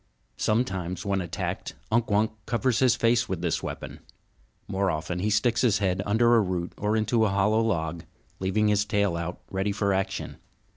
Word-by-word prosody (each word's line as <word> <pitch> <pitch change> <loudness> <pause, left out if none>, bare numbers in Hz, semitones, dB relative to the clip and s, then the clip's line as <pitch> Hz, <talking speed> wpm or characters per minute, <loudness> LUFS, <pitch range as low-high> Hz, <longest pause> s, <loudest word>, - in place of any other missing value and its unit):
Sometimes, 95 -5 -1
when 100 -1 0
attacked, 90 +3 -4 0.2
Unk 115 +1 +2
Wunk 105 +1 +2 0.2
covers 120 +1 +1
his 130 -3 +4
face 115 0 +2
with 95 -3 -2
this 85 - 0
weapon. - - -6 0.7
More 95 0 0
often 85 +2 -2
he 105 +4 0
sticks 120 +3 +2
his 115 -5 +3
head 95 -2 0
under 120 +3 +4
a 115 - +5
root 90 -3 -2
or 105 +2 0
into 110 +1 +2
a 110 - +3
hollow 105 +3 +2
log, 85 -7 -1 0.3
leaving 95 +3 +1
his 105 0 +3
tail 100 -4 +1
out 85 +1 -4
ready 95 +1 0
for 100 -1 0
action. 95 0 -2
100 Hz, 180 wpm, -26 LUFS, 95-110 Hz, 0.7 s, a